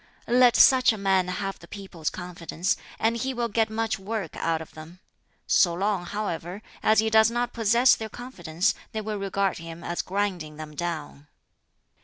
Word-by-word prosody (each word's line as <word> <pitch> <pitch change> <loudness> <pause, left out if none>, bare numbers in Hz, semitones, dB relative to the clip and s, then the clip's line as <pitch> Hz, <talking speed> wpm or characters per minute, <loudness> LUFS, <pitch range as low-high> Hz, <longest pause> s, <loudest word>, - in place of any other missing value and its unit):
"Let 245 0 +5
such 255 -2 +6
a 220 - -4
man 190 -2 +2
have 195 +2 -4
the 170 - -14
people's 190 -5 -5
confidence, 175 -1 -3 0.2
and 230 +1 +1
he 260 +2 -2
will 235 -1 -1
get 225 0 +1
much 225 -1 -2
work 195 -3 -4
out 165 -1 -1
of 160 - -10
them; 160 +3 -12 0.5
so 175 -3 +4
long, 195 -1 -1
however, 200 -1 -4 0.2
as 215 - +3
he 220 0 -1
does 220 0 +6
not 240 +1 -2
possess 235 +3 +4
their 220 -1 -6
confidence 180 -9 -2 0.2
they 220 - -2
will 215 -1 -4
regard 195 -1 -1
him 165 0 -9
as 175 - -2
grinding 180 -6 -3
them 155 -1 -8
down. 160 -3 -5
195 Hz, 175 wpm, -26 LUFS, 170-220 Hz, 0.5 s, such